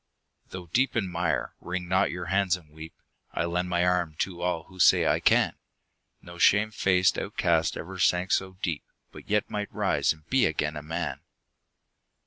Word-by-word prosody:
Though 90 -1 -8
deep 120 +10 0
in 105 -5 0
mire, 85 -1 -1
wring 90 0 -4
not 95 +1 +2
your 90 0 -5
hands 95 +1 +1
and 80 -4 -19
weep; 80 +1 -11 0.4
I 80 - -1
lend 90 +1 -2
my 90 0 +1
arm 90 -3 0
to 90 -2 -3
all 90 -2 -1
who 95 +1 -17
say - - +5
"I - - +2
can!" - - +3 0.7
No 85 -1 -11
shame 105 +2 +4
faced 95 -2 +2
outcast 80 -1 0
ever 95 +2 -7
sank 90 +1 +2
so 95 0 0
deep, 80 -6 -2 0.3
But - - -13
yet 105 0 +1
might 105 -1 -4
rise - - +1
and 80 -1 -9
be 130 -7 +3
again 75 -1 -2
a 75 - -5
man 80 +2 -4
90 Hz, 180 wpm, -27 LUFS, 85-95 Hz, 0.7 s, say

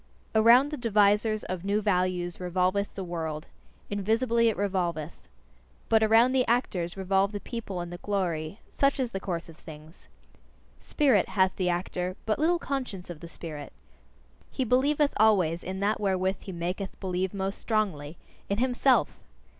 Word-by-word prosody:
Around 235 +6 +6
the 300 - -3
devisers 215 -1 +2
of 185 -1 -5
new 200 +2 +1
values 180 -4 0
revolveth 185 +2 0
the 195 - -4
world: 160 -3 -4 0.5
invisibly 230 +3 +2
it 220 - -3
revolveth. 175 -6 -2 0.7
But 220 -1 +4
around 225 +3 +5
the 260 -1 +3
actors 195 -7 0
revolve 195 +1 +1
the 205 - -3
people 205 -5 -6
and 175 0 -6
the 175 - -7
glory: 180 -4 -2
such 275 0 +1
is 250 -3 -1
the 195 - -3
course 175 -3 -4
of 165 -2 -13
things. 155 +1 -13 0.7
Spirit, 260 -10 +2
hath 190 -2 +2
the 185 -2 0
actor, 180 +1 -2
but 215 +3 0
little 335 +3 +3
conscience 255 - -4
of 165 - -9
the 170 - -9
spirit. 160 -3 -8 0.8
He 265 - -2
believeth 280 +4 +2
always 185 -6 +3
in 190 +1 -5
that 210 +2 +1
wherewith 190 -1 0
he 195 - -8
maketh 180 +3 -4
believe 185 -1 -2
most 195 0 -3
strongly 180 -9 -2 0.3
in 200 - 0
HIMSELF! 250 - +2
195 Hz, 155 wpm, -28 LUFS, 180-225 Hz, 0.8 s, Around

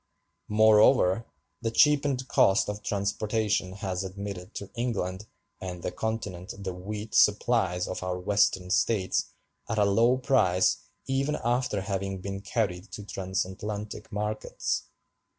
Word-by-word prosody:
Moreover, 110 -1 +5 0.3
the 115 - 0
cheapened 140 +1 +3
cost 95 -3 +4
of 105 0 -4
transportation 105 -1 -1
has 95 -1 -3
admitted 95 -1 -7
to 100 - -6
England 110 -5 -2 0.3
and 90 -2 -6
the - - -2
Continent 100 -2 -4
the 95 -2 -4
wheat 105 +3 -6
supplies 100 -4 +3
of 95 - -4
our 90 0 -2
Western 95 -1 +1
States 100 -2 +1 0.4
at 110 - -1
a 105 - +4
low 115 +5 +4
price 95 -9 +3 0.3
even 135 +3 0
after 120 -4 0
having 95 0 -3
been 95 +1 -5
carried 100 -4 -2
to 105 - -6
transatlantic 100 +2 -4
markets. 105 +1 -2
100 Hz, 125 wpm, -28 LUFS, 95-110 Hz, 0.4 s, Moreover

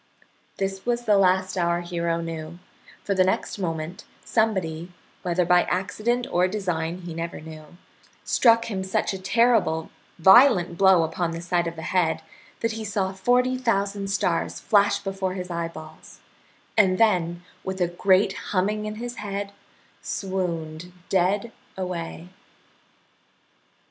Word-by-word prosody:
This 195 0 -3
was 240 0 -1
the 215 -3 +3
last 185 -1 +3
our 170 0 +1
hero 170 -1 -2
knew, 165 0 -6 0.5
for 200 - 0
the 185 -1 +4
next 190 +2 -1
moment 165 -1 -4 0.2
somebody 180 -7 0 0.3
whether 180 0 0
by 175 +1 +5
accident 215 +7 -1
or 180 +1 +3
design 180 -3 -2
he 175 -2 -7
never 165 +1 -5
knew 155 +1 -12 0.5
struck 230 -1 +4
him 195 -4 -3
such 190 +1 -1
a 190 - -5
terrible 195 -6 +2 0.3
violent 190 -1 +6
blow 190 -2 +5
upon 165 +1 -1
the 165 - -5
side 175 0 0
of 165 - -5
the 160 - -8
head 160 -3 0 0.4
that 230 - 0
he 220 0 -5
saw 200 -3 -1
forty 250 +6 +2
thousand 200 -4 0
stars 185 -3 0
flash 205 -2 +3
before 195 -2 -3
his 180 -1 -5
eyeballs, 165 -2 -7 0.6
and 190 -4 +4
then, 175 -6 +2 0.2
with 190 0 -4
a 175 - +2
great 190 +3 +3 0.2
humming 210 +2 0
in 215 - -5
his 240 +2 -6
head, 200 -1 -4 0.5
swooned 175 -3 -4 0.2
dead 195 +5 +1 0.3
away. 175 -2 -5
185 Hz, 140 wpm, -24 LUFS, 170-200 Hz, 0.6 s, violent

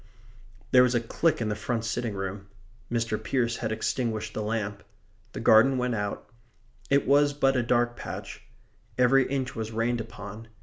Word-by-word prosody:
There 125 - +7
was 125 0 +3
a - - +4
click 155 +6 0
in 110 - -1
the 105 - -1
front 115 +2 -2
sitting 115 -1 -2
room. 95 +1 -5 0.4
Mr. 115 -2 -1
Pearce 120 -3 0
had 110 -2 -3
extinguished 110 0 -2
the - - -3
lamp. 105 -1 -3 0.5
The - - -5
garden 125 +5 +5
went 125 -1 0
out. 105 -2 -3 0.6
It 140 0 +3
was 145 +1 +4
but 135 -1 +2
a 125 - +3
dark 120 0 +1
patch. - - -7 0.6
Every 130 +1 +4
inch 130 -2 -2
was 110 -1 -4
rained 115 +1 0
upon. 110 -1 -9
115 Hz, 170 wpm, -27 LUFS, 110-125 Hz, 0.6 s, There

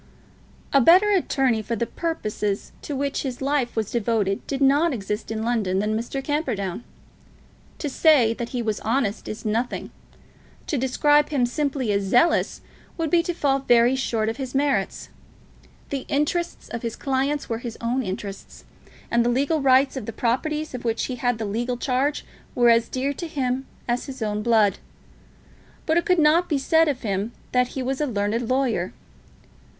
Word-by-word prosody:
A 275 - +6
better 370 - +6
attorney, 270 - +2
for 230 +2 -3
the 235 - -1
purposes 215 - -3
to 290 - -5
which 280 +1 -1
his 260 -3 -4
life 275 -3 0
was 220 -3 -2
devoted, 220 -4 0
did 275 - -2
not 285 +4 +4
exist 210 0 -4
in 220 0 -3
London 220 -6 0
than 210 +2 0
Mr. 240 +4 -3
Camperdown. 240 - -2 0.9
To 300 - -3
say 275 -5 +4
that 235 0 -5
he 245 -1 -3
was 215 -2 -1
honest, 225 -2 -1
is 215 - -6
nothing. 225 +3 -2 0.7
To - - -2
describe 290 +3 +3
him 275 -5 +2
simply 265 -2 -1
as 200 0 +1
zealous, 245 - +2 0.4
would 325 -3 -2
be 345 - +5
to 350 - -2
fall 275 -4 +1
very 245 -1 +4
short 230 -4 -1
of 225 - -2
his 265 -1 -5
merits. 280 0 0 0.8
The 275 -2 -3
interests 300 +4 -1
of 235 - -5
his 230 -2 -4
clients 275 +2 -1
were 225 -1 -2
his 235 -2 -7
own 240 +3 0
interests, 195 -2 -7 0.5
and 235 0 +3
the 240 - +1
legal 280 +5 +1
rights 265 +1 +4
of 255 -6 -5
the 225 - -4
properties 300 +7 -1
of 250 - -6
which 230 -1 0
he 255 - -4
had 245 -1 0
the 220 - -3
legal 240 +4 -2
charge, 265 +4 0 0.3
were 240 -1 +5
as 230 0 +3
dear 270 +2 -1
to 340 +4 -6
him 265 -3 -2 0.2
as 240 0 -1
his 260 -4 -5
own 210 -1 -1
blood. 220 -3 +3 1.1
But 320 - +2
it 345 - +1
could 365 - +4
not 320 +3 +4
be 300 - +2
said 320 +4 +3
of 270 -3 -2
him 205 +2 -2 0.2
that 250 +1 +1
he 260 - -1
was 265 +3 -2
a 300 - +1
learned 220 +1 -1
lawyer. 255 -9 0
250 Hz, 180 wpm, -24 LUFS, 225-285 Hz, 1.1 s, A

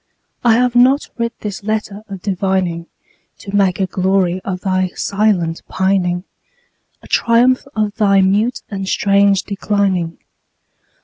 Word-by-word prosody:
I 235 -2 +5
have 245 0 +1
not 260 +4 +4
writ 235 0 0
this 205 -2 -5
letter 215 -1 -3
of 195 -2 -8
divining 185 -3 -1 0.5
To 200 0 -7
make 195 -2 +2
a 190 - +2
glory 185 -1 0
of 185 -2 -4
thy 185 -1 0
silent 195 -5 0
pining, 185 -2 0 0.8
A - - -13
triumph 245 +3 +3
of 210 -1 0
thy 200 -3 +4
mute 205 +6 +1
and 195 -1 -4
strange 200 -1 +3
declining. 195 -4 -1
195 Hz, 130 wpm, -17 LUFS, 185-215 Hz, 0.8 s, I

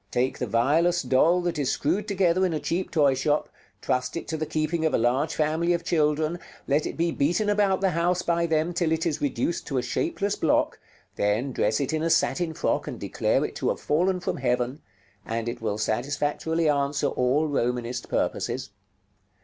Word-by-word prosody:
Take 125 +2 -1
the 125 - -2
vilest 145 - +2
doll 165 +7 +4
that 175 -3 -2
is 135 -3 +1
screwed 185 +8 -1
together 185 -3 +2
in 180 -3 +1
a - - -1
cheap 175 +5 -2
toy 145 -5 +3
shop, 145 +3 0 0.3
trust 130 +4 -1
it - - -6
to 160 - -1
the 155 0 -3
keeping 155 +1 -1
of 160 - +2
a - - +3
large 130 +7 +1
family 160 +3 +1
of 170 -1 -2
children, 155 +1 +1 0.3
let 145 +2 +1
it - - -6
be 170 +1 +1
beaten 175 +9 +1
about 200 -2 +2
the 190 -1 +2
house 175 +2 +1
by 170 0 +1
them 160 +2 0
till 170 -2 0
it 160 0 0
is 160 -4 -1
reduced 145 +4 -1
to 135 - -2
a 125 - 0
shapeless 205 - -1
block, - - +1 0.4
then 105 +7 0
dress 110 -3 +1
it 140 +2 -1
in 155 - 0
a 165 - 0
satin 165 0 +1
frock - - -1
and - - -6
declare - - 0
it - - -6
to - - 0
have - - -2
fallen 180 +5 +1
from 180 -1 -3
heaven, 125 +1 -1 0.4
and 115 +1 -3
it 120 0 -4
will 105 -2 -1
satisfactorily 145 +8 -1
answer 140 0 +1
all 135 +3 +1
Romanist 125 -3 -2
purposes. 125 -5 -2
155 Hz, 200 wpm, -26 LUFS, 130-170 Hz, 0.4 s, doll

